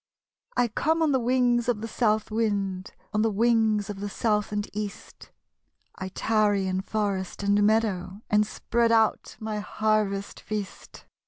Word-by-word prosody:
1 245 Hz, -1 st, +3 dB
come 320 Hz, +8 st, +1 dB
on 310 Hz, -, +3 dB
the 265 Hz, -, +3 dB
wings 245 Hz, -1 st, +2 dB
of 220 Hz, -3 st, 0 dB
the 225 Hz, -, -4 dB
South 215 Hz, -2 st, 0 dB
wind; 200 Hz, -4 st, -1 dB, 0.2 s
On 210 Hz, -, +2 dB
the 225 Hz, -, +3 dB
wings 220 Hz, -1 st, +2 dB
of 205 Hz, -2 st, -6 dB
the 205 Hz, +1 st, -4 dB
South 210 Hz, 0 st, 0 dB
and 205 Hz, 0 st, -2 dB
East; 210 Hz, -1 st, -7 dB, 0.6 s
I 190 Hz, -, -6 dB
tarry 205 Hz, -1 st, +1 dB
in 185 Hz, 0 st, -1 dB
forest 200 Hz, -2 st, -2 dB
and 200 Hz, +1 st, +3 dB
meadow, 205 Hz, -2 st, +1 dB
And 210 Hz, 0 st, +3 dB
spread 235 Hz, +1 st, 0 dB
out 225 Hz, -1 st, +2 dB
my 215 Hz, -1 st, -3 dB
harvest 210 Hz, -2 st, -1 dB
feast. 210 Hz, -3 st, -7 dB
215 Hz, 155 wpm, -26 LUFS, 200-225 Hz, 0.6 s, 1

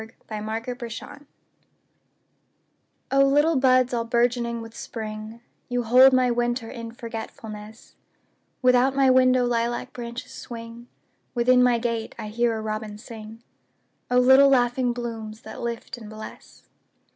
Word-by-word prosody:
A 220 Hz, -, -8 dB, 0.3 s
Song 220 Hz, +2 st, -4 dB
in 250 Hz, 0 st, -5 dB
Spring 285 Hz, +5 st, -9 dB, 1.8 s
O 275 Hz, 0 st, +5 dB
LITTLE 295 Hz, +3 st, +3 dB
buds 255 Hz, -1 st, +3 dB
all 235 Hz, -1 st, 0 dB
bourgeoning 235 Hz, 0 st, 0 dB
with 225 Hz, 0 st, -10 dB
Spring, 215 Hz, 0 st, -7 dB, 0.3 s
You 245 Hz, 0 st, -1 dB
hold 255 Hz, +4 st, +7 dB
my 255 Hz, -1 st, +3 dB
winter 240 Hz, 0 st, -1 dB
in 230 Hz, -1 st, -7 dB
forgetfulness; 220 Hz, -2 st, -9 dB, 0.7 s
Without 250 Hz, +1 st, +4 dB
my 270 Hz, -1 st, +4 dB
window 255 Hz, -1 st, +4 dB
lilac 240 Hz, 0 st, -1 dB
branches 235 Hz, 0 st, -7 dB
swing, 230 Hz, 0 st, -9 dB, 0.5 s
Within 250 Hz, +1 st, +4 dB
my 250 Hz, -1 st, +4 dB
gate 230 Hz, -1 st, -3 dB
I 215 Hz, -2 st, -6 dB
hear 230 Hz, +1 st, 0 dB
a -, -, -4 dB
robin 215 Hz, -1 st, -4 dB
sing—O 225 Hz, +2 st, -8 dB
little 265 Hz, +2 st, +7 dB
laughing 245 Hz, -1 st, +2 dB
blooms 225 Hz, -2 st, -6 dB
that -, -, -9 dB
lift 235 Hz, +1 st, -5 dB
and 220 Hz, -2 st, -10 dB
bless! 215 Hz, 0 st, -11 dB
235 Hz, 135 wpm, -24 LUFS, 225-250 Hz, 1.8 s, hold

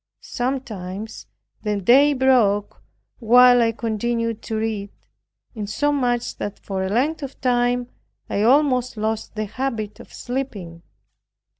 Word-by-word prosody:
Sometimes 220 Hz, -5 st, -5 dB, 0.3 s
the 210 Hz, -2 st, -1 dB
day 270 Hz, +9 st, +5 dB
broke 245 Hz, -7 st, +2 dB, 0.4 s
while 245 Hz, +1 st, +6 dB
I 230 Hz, -1 st, +3 dB
continued 230 Hz, 0 st, -2 dB
to 220 Hz, -, -5 dB
read, 215 Hz, -2 st, -2 dB, 0.6 s
insomuch, 245 Hz, +2 st, -1 dB
that 205 Hz, -, -5 dB
for 190 Hz, -1 st, -4 dB
a 190 Hz, -, -2 dB
length 280 Hz, +10 st, 0 dB
of 275 Hz, -1 st, -7 dB
time 245 Hz, -1 st, +1 dB, 0.4 s
I 200 Hz, -, -1 dB
almost 255 Hz, 0 st, +3 dB
lost 220 Hz, +1 st, -3 dB
the 215 Hz, 0 st, -2 dB
habit 220 Hz, -2 st, -4 dB
of -, -, -13 dB
sleeping. 210 Hz, -10 st, -5 dB
230 Hz, 120 wpm, -22 LUFS, 210-255 Hz, 0.6 s, while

